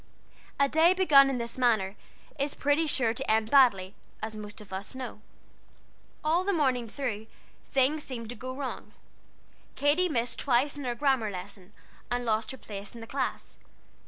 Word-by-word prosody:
A 280 - +5
day 325 +5 +4
begun 290 -7 +6
in 265 - -1
this 235 +1 -3
manner 215 -6 +2 0.4
is 280 +1 -1
pretty 290 +3 +2
sure 240 -6 +2
to - - -4
end 220 0 +2
badly, 205 -9 +5 0.3
as 220 0 -5
most 210 -1 -8
of 205 -3 -12
us 195 +6 -5
know. 250 -5 -7 1.0
All 325 +4 +2
the 400 - +1
morning 260 - +1
through, 220 -4 -4 0.4
things 275 +3 +2
seemed 230 -4 -6
to 245 - -6
go 255 +3 -6
wrong. 265 0 -6 0.8
Katy 310 +6 +2
missed 235 -4 -2
twice 270 +2 +2
in 285 -2 -6
her 240 -1 -1
grammar 265 -5 +1
lesson, 190 0 -9 0.4
and 245 0 -1
lost 220 -1 0
her 265 - -6
place 205 -2 -9
in - - -8
the - - -7
class. 265 +2 -3
250 Hz, 170 wpm, -29 LUFS, 220-280 Hz, 1.0 s, begun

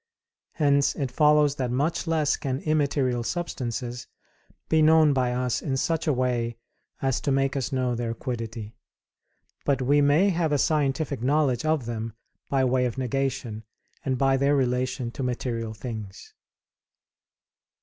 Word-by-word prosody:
Hence 140 -3 +2
it 135 -4 -3
follows 150 0 +4
that 130 -2 -1
much 145 +8 -1
less 155 -3 +2
can 130 -3 -3
immaterial 140 -5 +1
substances 120 -3 -4 0.6
be 160 -1 +3
known 155 -1 +6
by 130 -2 +1
us 125 0 -1
in 135 -3 -2
such 165 +4 -1
a - - +4
way 120 -3 -1 0.5
as 135 -1 +1
to 140 - 0
make 135 +1 +1
us 135 0 -2
know 130 -2 0
their 115 -1 -3
quiddity; 115 -3 -5 0.9
but 140 -1 +1
we 140 +3 +3
may 150 +8 +4
have 165 -3 0
a 145 - +3
scientific 145 -2 0
knowledge 135 -1 +1
of 155 -5 +1
them 115 -1 -4 0.4
by 135 -1 +2
way 125 0 +2
of 120 - -6
negation 130 -4 -2 0.4
and 130 -1 -1
by 135 +1 +3
their 140 +2 +3
relation 125 -2 0
to 135 - -7
material 120 -3 -3
things. 105 -4 -8
130 Hz, 150 wpm, -26 LUFS, 120-145 Hz, 0.9 s, known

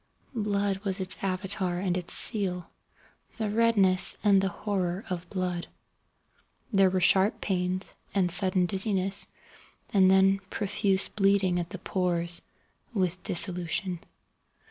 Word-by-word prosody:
Blood 205 -3 -1
was 195 -1 -4
its 185 0 +1
Avatar 185 -1 -2
and 180 -1 -2
its 180 -1 -4
seal—the 200 +2 0
redness 205 -5 +2
and 200 -2 +4
the 195 - -1
horror 190 -1 -3
of 175 -1 -5
blood. 180 -2 -3 1.1
There 195 -1 +4
were 185 0 -1
sharp 190 +3 +3
pains, 185 0 -2 0.2
and 180 -3 +2
sudden 185 0 +2
dizziness, 195 +1 +2 0.7
and 190 -2 +5
then 190 +1 +4
profuse 195 -1 +1
bleeding 195 -3 +1
at 170 0 -5
the 195 - -7
pores, 175 -2 -2 0.5
with 185 -2 -1
dissolution. 180 0 0
190 Hz, 120 wpm, -27 LUFS, 180-200 Hz, 1.1 s, and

